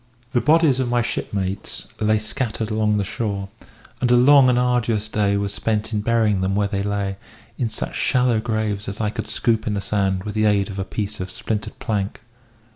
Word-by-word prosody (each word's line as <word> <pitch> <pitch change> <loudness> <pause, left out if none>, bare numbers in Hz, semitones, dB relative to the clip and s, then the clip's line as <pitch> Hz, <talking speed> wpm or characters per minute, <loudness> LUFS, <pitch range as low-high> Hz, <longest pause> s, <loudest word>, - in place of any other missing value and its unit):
The 120 - +2
bodies 155 -3 +4
of 130 -2 0
my 120 0 +2
shipmates 95 -3 -3
lay 110 0 +3
scattered 110 0 -2
along 105 -1 +1
the 100 - +1
shore; 100 -1 -3 0.5
and 125 - +2
a 125 - +6
long 130 +1 +7
and 125 - +3
arduous 120 -3 +1
day 100 -2 +1
was 100 0 -2
spent 110 +1 -1
in 105 - 0
burying 110 -3 +2
them 95 +1 0
where 100 0 +2
they 100 -1 -2
lay, 100 -1 -2 0.4
in 120 - 0
such 110 - -4
shallow 125 -3 +2
graves 110 -3 -2
as 100 - -7
I 105 -1 0
could - - -5
scoop 110 -2 0
in 105 - 0
the - - -1
sand 95 -1 0
with 105 - -5
the 110 0 +1
aid 100 -1 +2
of 95 - -6
a 95 - -2
piece 105 +1 -4
of 90 0 -4
splintered 105 +3 -4
plank. 100 -2 -2
105 Hz, 205 wpm, -22 LUFS, 100-115 Hz, 0.5 s, long